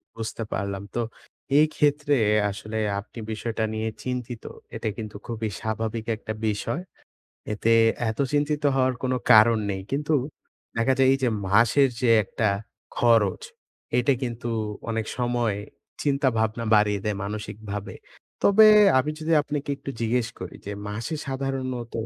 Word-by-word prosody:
বুঝতে 115 0 -4
পারলাম। 100 0 -3
তো 120 - +1 0.6
এই 155 - +7
ক্ষেত্রে 145 0 +2 0.4
আসলে 110 +2 -6 0.2
আপনি 110 +3 -10
বিষয়টা 110 0 -3
নিয়ে 110 0 -2
চিন্তিত। 125 -2 -4 0.3
এটা 110 - -2
কিন্তু 110 -2 -6
খুবই 110 -2 -3
স্বাভাবিক 110 0 -3
একটা 110 -1 -5
বিষয়। 110 - -2 0.7
এতে 110 +2 +1 0.4
এত 110 - -7
চিন্তিত 150 0 +1
হওয়ার 130 -1 +2
কোনো 130 0 0 0.2
কারণ 110 +1 +7
নেই। 95 -1 -3
কিন্তু 150 +3 0 0.6
দেখা 115 +3 +3
যায় 130 - +5
এই 135 - +3
যে 125 - +3 0.2
মাসের 115 +7 +5
যে 125 -3 +3
একটা 110 +2 0 0.5
খরচ, 115 -5 +3 0.5
এইটা 125 +3 +3
কিন্তু 120 -1 -3 0.4
অনেক 110 -1 -2
সময় 120 -4 0 0.5
চিন্তাভাবনা 120 -6 +1
বাড়িয়ে 105 -1 +3
দেয় 105 -2 -1
মানসিকভাবে। 105 0 -6 0.5
তবে 215 +2 +7 0.3
আমি 145 +4 0
যদি 160 +1 -1
আপনাকে 145 -1 -4
একটু 140 0 -7
জিজ্ঞেস 115 +1 +1
করি 90 - -7
যে 100 - -3 0.2
মাসে 115 +8 -4
সাধারণত 130 -3 -3
115 Hz, 135 wpm, -25 LUFS, 110-135 Hz, 0.7 s, এই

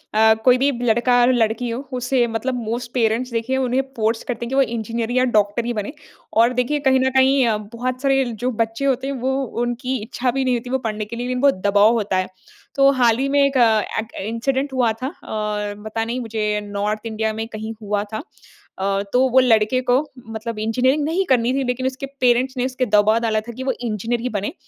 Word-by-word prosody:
अ, 220 0 +6
कोई 250 -1 +6
भी 275 +3 +2
लड़का-लड़की 240 0 +2
हो 230 +2 -3 0.2
उसे 245 0 +1
मतलब 235 +3 -2
मोस्ट 235 +2 -4
पेरेंट्स 235 +1 0
देखिए 235 +3 -1
उन्हें 260 0 +1
फ़ोर्स 225 0 0
करते 240 -1 -4
है - - -6
कि 265 - -2
वो 275 - +5
इंजीनियर 230 -1 -2
या 255 +1 +2
डॉक्टर 210 +3 +2
ही 240 - -1
बने। 210 +4 -4 0.4
और 230 +3 +4
देखिए 250 +4 0
कहीं 265 -2 +3
न 260 0 +2
कहीं 265 0 +4
अ, 220 -2 +1
बहुत 240 +4 -5
सारे 270 -1 +3
जो 240 +1 -3
बच्चे 225 +4 -5
होते 265 -1 0
हैं 280 - -2
वो 260 +1 0 0.3
उनकी 245 +2 -2
इच्छा 245 +3 -2
भी 270 +2 -1
नहीं 255 -1 +2
होती 240 +1 -5
वो 265 - +1
पढ़ने 215 -1 -3
के 225 +3 -8
लिए 240 +1 -4
लेकिन 250 0 -2
बहुत 280 -1 +4
दबाव 205 +2 +5
होता 210 -5 0
है। 185 0 0 0.5
तो 275 0 +5
हाल 230 -2 +4
ही 270 +2 0
में 285 +1 +3
एक 275 -1 0
अ, 225 -3 +4 0.2
एक 220 +1 -6
इंसिडेंट 265 +5 -1
हुआ 245 -3 +2
था - - 0 0.2
और 210 -1 -3
पता 225 +1 -2
नहीं 235 +3 -3
मुझे 215 -2 -1
नॉर्थ 205 +2 -3
इंडिया 220 -1 -2
में 220 +1 -4
कहीं 220 0 -6
हुआ 205 -1 -1
था। 215 - -3 0.6
अ, 195 +1 0
तो 255 +1 +4
वो 260 +1 +5
लड़के 230 -1 +3
को 250 +1 +5 0.3
मतलब 225 0 -5
इंजीनियरिंग 255 +7 +1
नहीं 345 +5 0
करनी 250 -1 +3
थी 270 0 0
लेकिन 250 0 -2
उसके 260 +1 -4 0.2
पेरेंट्स 255 +1 +2
ने 250 - 0
उसके 255 0 -1
दबाव 215 0 +3
डाला 220 -2 +1
था 230 +2 -9
कि 260 - -4
वो 265 - 0
इंजीनियर 230 +1 -2
ही 250 - -2
बने। 205 -3 -3
235 Hz, 220 wpm, -21 LUFS, 220-255 Hz, 0.6 s, अ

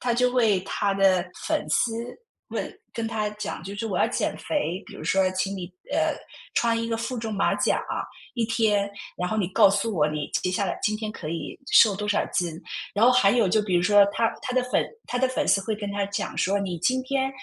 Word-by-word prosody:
他 240 -1 0
就 250 +1 +3
会 225 -7 +3
他 195 +1 -1
的 190 -2 +4 0.2
粉 310 -1 0
丝， 230 - +2 0.6
问 - - -3 0.2
跟 230 -1 -3
他 215 -2 -1
讲： 210 0 -5
“就 200 +1 -6
是 225 +2 -3
我 200 - -1
要 - - +4
减 - - -1
肥， 195 - -2
比 215 - -12
如 - - -9
说 190 -1 +2
请 195 +1 -1
你， 180 -2 -5 0.3
呃， - - +2 0.4
穿 230 -1 +2
一 230 - -3
个 225 - 0
负 240 +2 -3
重 220 -2 -3
马 195 - +2
甲， - - +1 0.5
一 235 -2 0
天， 210 -3 +1 0.3
然 180 0 -2
后 220 - -1
你 190 -4 0
告 190 - +6
诉 205 +3 0
我， 150 -5 +2
你 150 -1 -4
接 180 - -1
下 200 - 0
来 - - -2
今 215 0 +1
天 215 -1 -4
可 155 - -7
以 165 -2 -5
瘦 205 -4 +7
多 210 0 -3
少 205 - +2
斤。” 175 -2 0 0.4
然 215 +3 +4
后 250 - +7
还 250 -6 +5
有 230 -6 +3
就 215 +4 +3
比 190 -4 -1
如 175 - +3
说 205 +1 +6
他 230 -1 +1
他 255 - -4
的 255 - +3
粉 - - +2 0.2
他 245 - -2
的 260 - +3
粉 255 - -1
丝 195 - +4
会 215 +2 -2
跟 205 -1 -5
他 200 -1 -1
讲 200 - -4
说： 200 +2 +2
“你 180 -4 -3
今 255 +9 +1
天 265 0 0
210 Hz, 255 characters per minute, -25 LUFS, 195-230 Hz, 0.6 s, 瘦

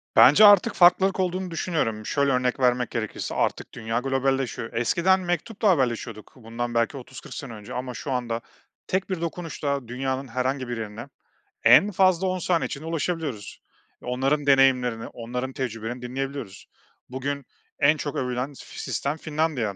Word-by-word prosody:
Bence 150 +11 +8
artık 205 -3 +7
farklılık 190 +2 +5
olduğunu 185 0 -1
düşünüyorum. 150 -11 -2
Şöyle 140 +2 +1
örnek 125 0 0
vermek 125 -1 +2
gerekirse: 110 -2 -4
Artık - - -1
dünya 115 +1 -2
globalleşiyor, 135 -2 -1
eskiden 170 +11 +2
mektupla 185 +5 -1
haberleşiyorduk 120 - -1
bundan 120 0 -5
belki 115 +4 +1
30-40 130 0 -10
sene 135 -5 -7
önce 105 -2 -9
ama 125 0 -4
şu 135 - -5
anda 120 -2 -2 0.5
tek 190 +1 -1
bir 185 -3 -3
dokunuşla 155 -6 -3
dünyanın 130 +2 -3
herhangi 130 +2 -2
bir 120 -1 -4
yerine 110 +3 -6 0.6
en 210 - +7
fazla 185 -1 +3
10 185 0 -1
saniye 175 -1 +1
içinde 145 +3 -6
ulaşabiliyoruz. 160 - -3 0.4
Onların 135 +4 0
deneyimlerini, 130 -4 +3
onların 125 +3 -5
tecrübelerini 120 -1 -4
dinleyebiliyoruz. 130 -4 -5 0.4
Bugün 135 +2 -4 0.3
en 150 +2 +4
çok 145 -1 -4
övülen 125 +2 -2
f - - -12
sistem 140 +3 -2
Finlandiya. 150 -9 -1
135 Hz, 145 wpm, -25 LUFS, 120-160 Hz, 0.6 s, Bence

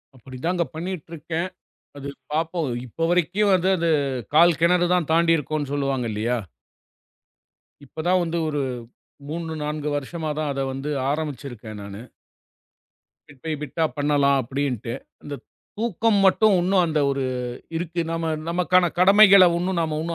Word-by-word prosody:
அப்படித்தான்ங்க 135 +8 -3
பண்ணிக்கொண்டு 170 0 -6
இருக்கிறேன். 165 +3 -3 0.5
அது 140 0 -6 0.2
பார்ப்போம். 165 -1 -1 0.2
இப்ப 165 +8 -2
வரைக்கும் 190 +4 +2
அது 180 +2 -1
அது 170 0 0 0.5
கால் 170 0 +6
கிணறுதான் 175 -1 +2
தாண்டி 165 0 +4
இருக்கிறோம்னு 150 -1 -3
சொல்லுவாங்க 135 -4 -1
இல்லையா? 115 +4 -1 1.5
இப்பதான் 175 +6 0
வந்து 170 0 -2
ஒரு 145 -2 -1 0.7
3 165 +1 -4
4 150 0 -3
வருஷமாதான் 155 0 -3
அதை 135 0 -2
வந்து 135 +3 -5 0.2
ஆரம்பித்திருக்கிறேன் 130 -8 -5
நானு. 100 +1 -8 1.3
பிட் 145 -3 -18
பை 160 - -2
பிட்டா 160 +3 -2
பண்ணலாம் 145 -1 +3
அப்படின்னு 135 +2 -2
விட்டு. 115 +2 -6 0.3
அந்தத் 145 -1 -8 0.3
தூக்கம் 225 -1 +1
மட்டும் 210 +2 +4
ஒன்றும் 185 0 +3
அந்த 155 -1 0
ஒரு 135 -1 -1 0.5
இருக்கு. 170 +1 -3
நாம 165 -1 -1 0.2
நமக்கான 180 0 +2
கடமைகளை 195 0 +8
ஒன்றும் 180 0 -1
நாம 155 -1 -2
160 Hz, 130 wpm, -23 LUFS, 140-175 Hz, 1.5 s, கடமைகளை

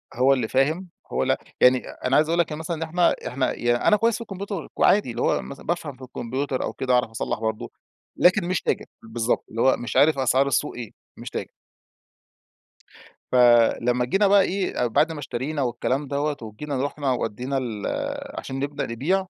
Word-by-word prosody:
هو 130 +3 +4
اللي 125 -4 -1
فاهم، 155 +9 0 0.2
هو - - 0
ل - - +2 0.3
يعني 125 0 +5
أنا 130 +2 -2
عايز 155 +1 +4
أقول 170 +1 +1
لك 170 - +1
يعني 150 - -4
مثلًا 160 0 -3
إن - - -9
إحنا 170 +2 +2
إحنا 130 0 -1
يعن 120 0 +1
أنا 210 - +4
كويس 230 +1 +2
في - - -6
الكمبيوتر 200 -4 -5
وعادي 200 - +3
اللي 120 - -4
هو - - +2
مثلًا 140 - -10
بافهم 160 -5 -3
في - - -19
الكمبيوتر 130 +2 -3
أو - - -3
كده 130 -1 -1
أعرف 125 -2 +2
أصلح 110 -1 -3
برضه، 110 -1 -3 0.5
لكن 180 +1 +4
مش 185 0 0
تاجر، - - -1 0.2
بالضبط، 115 +1 -1
اللي 115 - -3
هو 130 - +5
مش 120 - -6
عارف 150 -1 +5
أسعار 130 +1 +3
السوق 135 - 0
إيه. 120 -3 -7 0.3
مش - - -7
تاج - - -4 1.8
فلمّا 120 0 +4
جينا 195 +9 +2
بقى 200 0 +6
إيه 185 -10 0
بعد 155 +8 +2
ما 155 - -6
اشترينا 140 +2 -3
والكلام 130 +3 -1
دَوَّة 145 +1 -1
وجينا 130 +5 -4
رُحنا 145 -2 -2
ودّينا 125 +3 -2
ال 115 -6 -3 0.5
عشان 135 0 -5
نبدأ 140 +1 -2
نبيع، 160 +12 0
135 Hz, 190 wpm, -24 LUFS, 125-160 Hz, 1.8 s, بقى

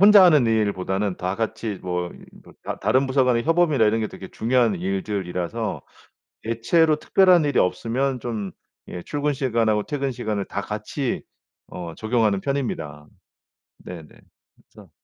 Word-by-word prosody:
혼자 205 0 +9
하는 150 -9 +5
일보다는 100 -3 0
다 90 +1 -2
같이 110 -2 -3
뭐 90 -1 -2
이 - - -14 0.3
뭐 - - -15
다 - - -5
다른 135 +1 +2
부서 130 0 +2
간의 120 -2 +2
협업이나 165 -7 +3
이런 110 +2 +2
게 110 - 0
되게 95 - -10
중요한 115 -3 +2
일들이라서 95 +2 -3 0.6
대체로 150 +8 +2
특별한 180 0 +4
일이 145 - +1
없으면 125 +7 0
좀 110 -5 -4 0.4
예 90 - -6
출근 145 +5 -1
시간하고 115 -6 +1
퇴근 140 -2 -2
시간을 105 -4 -3
다 100 - -3
같이 110 +6 -3 0.5
어 85 -2 -7
적용하는 110 -3 +1
편입니다. 80 - -3 0.8
네네. 85 -4 -8 0.5
그래서 - - -18
115 Hz, 315 characters per minute, -23 LUFS, 100-135 Hz, 0.8 s, 혼자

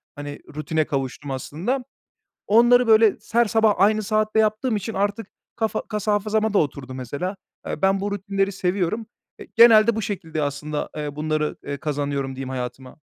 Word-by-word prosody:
hani, 145 0 -7 0.2
rutine 155 +1 -1
kavuştum 140 0 -4
aslında. 175 - -3 0.6
Onları, 240 +3 +5
böyle, 220 -1 +5
se 230 - -3
her 235 - +6
sabah 220 -1 +3
aynı 215 +2 +3
saatte 215 +1 0
yaptığım 215 +2 +1
için 215 +2 -4
artık 205 +3 -1 0.3
kafa 220 -2 -1
kas 210 -2 -4
hafızama 215 +1 +1
da - - +5
oturdu 135 -3 -2
mesela. 140 - -4 0.3
Eee, - - -5
ben 195 0 +3
bu 205 +1 -2
rutinleri 195 0 -1
seviyorum, 190 +3 -1 0.3
eee, - - -11
genelde 230 -1 +7
bu 220 - -2
şekilde 165 -6 -3
aslında, 145 +1 -3
eee, 150 -1 -4
bunları, 155 0 -1
eee, 140 - -4
kazanıyorum 140 -2 -3
diyeyim 135 0 -5
hayatıma. 130 0 -6
195 Hz, 165 wpm, -23 LUFS, 145-215 Hz, 0.6 s, genelde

